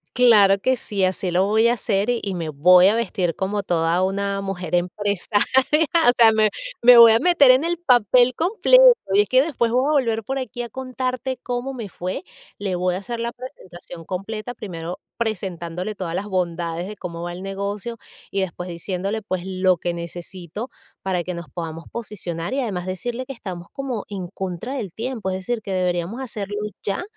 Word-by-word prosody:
Claro 210 -6 +6
que 260 +4 +1
sí, 200 -4 -2
así 185 0 -1
lo 180 +2 +2
voy 220 +3 +3
a - - +3
hacer 210 -2 -1
y 240 -1 +1
y 195 -2 -2
me 165 -3 -3
voy 180 +5 +6
a 210 - +3
vestir 190 -7 -1
como 200 +1 -1
toda 170 -1 +1
una 200 +1 -1
mujer 180 -3 -5
empresaria. 200 +3 0 0.6
O - - +8
sea, 225 -2 +7
me 215 -1 +3 0.3
me 245 0 +8
voy 230 -1 +10
a 225 - +4
meter 335 -7 +6
en 260 +4 +3
el 345 0 -1
papel 250 - +4
completo, 440 - +4 0.3
y 205 - +6
es 205 - -3
que 255 +1 +5
después 240 -7 0
voy 255 +3 +2
a - - +2
volver 230 -6 +1
por 270 +4 -3
aquí 245 -1 -5
a 235 - -7
contarte 255 0 -3
cómo 250 +2 -3
me 230 -5 -6
fue. 185 +1 -5 0.3
Le 195 -3 -2
voy 180 0 0
a - - -2
hacer 235 +3 -5
la 235 0 -2
presentación 180 - -10
completa, 215 +5 -5
primero 175 -3 -6 0.2
presentándole 185 -3 -3
todas 170 -4 -4
las 205 +3 -3
bondades 175 -2 -2
de 210 - -7
cómo 170 -2 -7
va 175 - -4
el 180 - -8
negocio 200 +4 -4 0.3
y 195 - -1
después 180 -1 -4
diciéndole, 195 +5 -3
pues, 185 -3 -3
lo 185 -1 +2
que 175 +1 -3
necesito 175 +5 -7 0.3
para 180 -2 -1
que 180 - -4
nos 170 -1 -7
podamos 165 -1 -6
posicionar, 195 -4 -4
y 275 - 0
además 190 -8 -3
decirle 240 +7 -4
que 270 - -6
estamos 180 -7 -8
como 260 -6 -4
en 190 -3 -5
contra 190 +7 -5
del 205 -9 -4
tiempo, 230 -4 -4
es 185 - -2
decir, 220 +4 -3
que 195 - -6
deberíamos 180 +6 -1
hacerlo 205 -5 -5 0.3
ya. 200 - -2
200 Hz, 195 wpm, -22 LUFS, 180-235 Hz, 0.6 s, voy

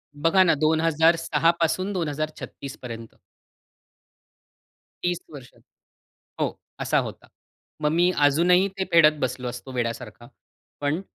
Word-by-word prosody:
बघा 165 +6 +4
ना 170 - +4
2006 160 0 +3
पासून 185 +4 0
2036 155 -4 -5
पर्यंत 115 -2 -8 1.9
30 175 0 0
वर्ष 135 -4 -11 0.9
हो, - - -2 0.2
असा - - +1
होता. - - -7 0.5
मग 150 0 +1
मी 175 +2 +3
अजूनही 180 +6 +4
ते 190 - -1
फेडत 155 -2 +7
बसलो 130 -1 -2
असतो 125 +2 -8
वेड्यासारखा. 120 -1 -4 0.5
पण 145 +5 0
155 Hz, 110 wpm, -24 LUFS, 130-170 Hz, 1.9 s, फेडत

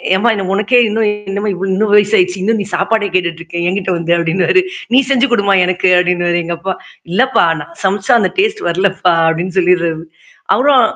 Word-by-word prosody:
ஏம்மா 215 +5 +1
என்ன 195 -2 -4
உனக்கே 215 +5 +1
இன்னும் 215 0 0 0.2
என்னமா 205 +2 -2
இவ்ள 190 +2 -4
இன்னும் 210 +1 0
வயச 205 0 +3
ஆயிடுச்சு. 180 +1 0
இன்னும் 220 +2 0
நீ - - -4
சாப்பாட 215 +2 0
கேட்டுட்டு 170 -2 -1
இருக்கே. 170 0 -6
என்கிட்ட 190 0 -2
வந்த 170 0 -1
அப்டின்வாரு. 175 - +1 0.3
நீ 255 - +6
செஞ்சு 270 -1 +3
குடுமா 200 -3 +2
எனக்கு" 185 +1 0
அப்டின்னுவாரு 175 -1 0
எங்க 170 +1 -4
அப்பா. 190 +2 -3 0.4
இல்லப்பா 260 +8 +2 0.2
நான் 150 +3 -11
சமைச்சா 195 0 0
அந்த 190 - +1
டேஸ்ட் 425 +1 0
வரலப்பா" 185 0 +1
அப்டின்னு 175 +3 -2
சொல்லிடுறது. 170 -3 0 0.5
அப்புறம் 270 0 +3
190 Hz, 180 wpm, -14 LUFS, 175-210 Hz, 0.5 s, நீ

